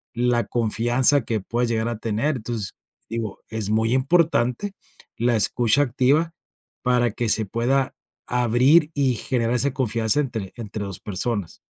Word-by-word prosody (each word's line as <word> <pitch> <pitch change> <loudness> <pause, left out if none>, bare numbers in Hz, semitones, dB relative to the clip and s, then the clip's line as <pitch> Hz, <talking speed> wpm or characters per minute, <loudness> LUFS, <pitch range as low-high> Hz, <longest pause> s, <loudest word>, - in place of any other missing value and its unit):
la 120 0 +1
confianza 120 +4 +3
que 110 -2 -1
puedes 120 +5 -1
llegar 110 0 0
a 120 - -4
tener. 115 +7 -1
Entonces, 110 -4 -5 0.4
digo, 115 -3 -5
es 110 -2 -3
muy 110 +2 +2
importante, 150 +3 +1 0.4
la 120 +1 +2
escucha 120 +4 +3
activa, 145 +6 +1 0.5
para 125 -2 +2
que 115 +1 -2
se 110 +1 +2
pueda, 125 +6 0 0.3
abrir 125 +7 +3
y 135 -4 +1
generar 120 +1 -1
esa 135 +2 +1
confianza 115 -1 0
entre 115 -9 -5
entre 105 -2 -5
2 95 -2 -6
personas. 105 -1 -3
120 Hz, 145 wpm, -23 LUFS, 110-130 Hz, 0.5 s, confianza